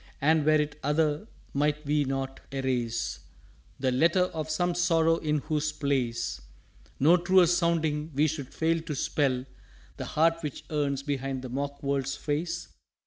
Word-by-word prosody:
_" -, -, -25 dB, 0.2 s
"And 155 Hz, +2 st, +3 dB
were 155 Hz, -, +6 dB
it 150 Hz, 0 st, -2 dB
other, 150 Hz, +5 st, +1 dB, 0.3 s
might 150 Hz, +1 st, 0 dB
we 145 Hz, 0 st, +2 dB
not 135 Hz, 0 st, -3 dB
erase 125 Hz, -4 st, -1 dB, 0.6 s
The 130 Hz, -1 st, +1 dB
Letter 170 Hz, +8 st, +3 dB
of 155 Hz, -1 st, -4 dB
some 175 Hz, +3 st, +1 dB
Sorrow 165 Hz, -2 st, +3 dB
in 150 Hz, -2 st, 0 dB
whose 155 Hz, 0 st, -1 dB
place 135 Hz, -6 st, -1 dB, 0.6 s
No 160 Hz, +6 st, +6 dB
truer 180 Hz, +1 st, +5 dB
sounding, 165 Hz, -3 st, +1 dB
we 145 Hz, +2 st, +4 dB
should 150 Hz, -4 st, -3 dB
fail 165 Hz, 0 st, +1 dB
to 160 Hz, -2 st, -5 dB
spell 130 Hz, -2 st, 0 dB, 0.5 s
The -, -, -4 dB
Heart 165 Hz, +2 st, +2 dB
which 150 Hz, -4 st, -5 dB
yearns 140 Hz, -2 st, 0 dB
behind 135 Hz, -2 st, -3 dB
the 130 Hz, -, -6 dB
mock 140 Hz, +2 st, -4 dB
world's 140 Hz, -1 st, 0 dB
Face?" 170 Hz, +4 st, -3 dB
150 Hz, 155 wpm, -28 LUFS, 135-160 Hz, 0.6 s, were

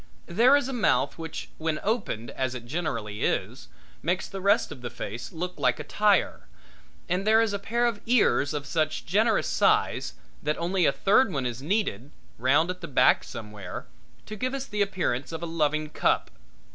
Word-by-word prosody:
There 235 Hz, +10 st, +5 dB
is 285 Hz, -3 st, -1 dB
a 270 Hz, -, -4 dB
mouth 190 Hz, -, +1 dB
which 160 Hz, -1 st, -6 dB
when 160 Hz, -1 st, -1 dB
opened, 200 Hz, -, -2 dB
as 130 Hz, -1 st, -2 dB
it 120 Hz, -1 st, -7 dB
generally 120 Hz, -8 st, -3 dB
is, -, -, -1 dB, 0.3 s
makes 180 Hz, +2 st, -1 dB
the 195 Hz, -, -7 dB
rest 200 Hz, -3 st, +3 dB
of 140 Hz, -4 st, -9 dB
the 120 Hz, -, -4 dB
face 120 Hz, -1 st, -6 dB
look 180 Hz, +2 st, -4 dB
like -, -, +2 dB
a -, -, -4 dB
tire, 210 Hz, -1 st, +1 dB, 0.6 s
and 185 Hz, +3 st, -1 dB
there 220 Hz, +1 st, +6 dB
is 225 Hz, -2 st, +2 dB
a 200 Hz, -, -2 dB
pair 235 Hz, +4 st, 0 dB
of 230 Hz, -4 st, -1 dB
ears 225 Hz, -, +3 dB
of 145 Hz, -1 st, -3 dB
such 155 Hz, +2 st, -1 dB
generous 215 Hz, +4 st, +2 dB
size -, -, +1 dB, 0.3 s
that 150 Hz, +1 st, -1 dB
only 175 Hz, 0 st, +1 dB
a -, -, +4 dB
third 200 Hz, -, +3 dB
one 135 Hz, -6 st, -2 dB
is 120 Hz, 0 st, -3 dB
needed, 150 Hz, -, -1 dB, 0.3 s
round 140 Hz, +8 st, +3 dB
at 180 Hz, 0 st, -9 dB
the 165 Hz, -, -5 dB
back 140 Hz, -, +4 dB
somewhere, 105 Hz, -4 st, -8 dB, 0.4 s
to 215 Hz, -, -7 dB
give 255 Hz, +5 st, -2 dB
us 270 Hz, 0 st, -4 dB
the 210 Hz, -5 st, -3 dB
appearance 180 Hz, -10 st, -1 dB
of 165 Hz, 0 st, -5 dB
a -, -, -1 dB
loving 155 Hz, -2 st, 0 dB
cup. -, -, +1 dB
170 Hz, 190 wpm, -27 LUFS, 135-205 Hz, 0.6 s, there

